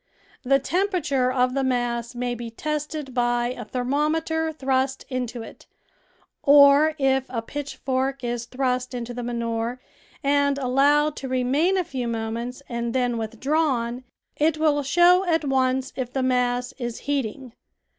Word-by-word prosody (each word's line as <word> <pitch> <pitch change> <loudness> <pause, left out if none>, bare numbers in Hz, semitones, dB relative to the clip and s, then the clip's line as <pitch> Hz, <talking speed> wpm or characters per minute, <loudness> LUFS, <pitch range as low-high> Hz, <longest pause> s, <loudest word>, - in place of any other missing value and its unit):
The 275 +1 +3
temperature 295 -5 0
of 255 0 +1
the 275 0 0
mass 240 -2 -1
may 245 0 -2
be 235 -1 -6
tested 300 +2 -4
by 240 -1 +1
a 250 -1 -5
thermometer 305 +7 -1
thrust 265 -2 -1
into 250 -3 -3
it, - - -13 0.7
or 285 +2 +6
if 265 -2 +1
a 230 -3 -3
pitchfork 270 -1 -3
is 240 -1 -2
thrust 255 0 -2
into 240 0 -5
the 245 - -5
manure 235 0 -2 0.4
and 280 0 +2
allowed 285 +3 +3
to 270 - -5
remain 265 +9 +1
a 370 - +2
few 260 -8 -4
moments 230 +3 -4
and 235 0 -3
then 245 -2 +1
withdrawn, 245 +1 -1 0.3
it 310 +1 +2
will 305 -2 +2
show 350 +6 +5
at 325 -2 +1
once 265 -1 +1
if 250 -2 -4
the 265 0 -1
mass 250 -1 0
is 240 -2 -4
heating. 265 -3 -3
260 Hz, 145 wpm, -24 LUFS, 245-285 Hz, 0.7 s, or